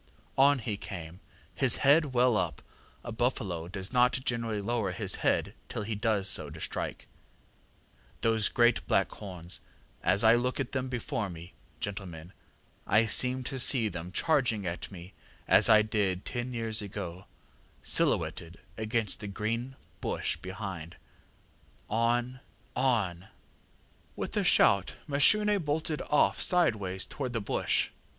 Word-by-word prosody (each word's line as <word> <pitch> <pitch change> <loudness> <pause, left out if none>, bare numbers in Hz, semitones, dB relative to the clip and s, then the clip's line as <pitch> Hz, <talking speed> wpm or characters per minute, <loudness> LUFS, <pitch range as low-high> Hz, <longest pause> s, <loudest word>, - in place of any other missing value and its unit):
ŌĆ£On 140 0 +4
he 105 -2 -3
came, 85 -4 -8 0.3
his - - +3
head 150 +3 +6
well 125 -3 +2
up 90 -5 -2 0.4
(a - - -6
buffalo 110 -8 -2
does 95 +4 -4
not 125 +1 +4
generally 115 -3 -1
lower 105 -2 -1
his - - -1
head - - 0 0.2
till - - -4
he 110 +2 -3
does 105 -2 0
so 75 -5 0
to 80 +2 -10
strike); - - -4 1.1
those 110 -2 +2
great 120 -8 +3
black - - +2
horns 90 -4 -7 0.4
as 95 +4 +4
I 110 0 +7
look 125 +3 0
at 135 -2 -3
them 130 -1 -3
before 115 -4 -3
me, 85 0 -10 0.3
gentlemen, 90 -4 -6 0.5
I 110 +2 +4
seem 125 +3 +4
to 135 +1 -4
see 120 -3 +5
them 85 -4 -6
come - - -10
charging 120 - +1
at 85 0 -4
me 90 0 -11 0.3
as - - +6
I 110 -1 +7
did 100 -4 -1
ten 120 0 -4
years 115 -3 0
ago, 95 -3 -7 0.6
silhouetted 85 +3 +1 0.2
against 110 -1 -1
the 105 - -7
green 115 +6 -3 0.3
bush - - -1
behind; 95 -4 -7 1.0
on, 120 +3 0 0.4
on! 105 -9 0 0.9
ŌĆØ - - -3
ŌĆ£With - - -6
a - - +2
shout 100 -1 +4
Mashune 205 +8 +4
bolted 155 +1 -2
off 150 - +2
sideways 105 - +1
towards 130 -4 -5
the 115 - 0
bush. 100 - 0
110 Hz, 145 wpm, -29 LUFS, 95-125 Hz, 1.1 s, I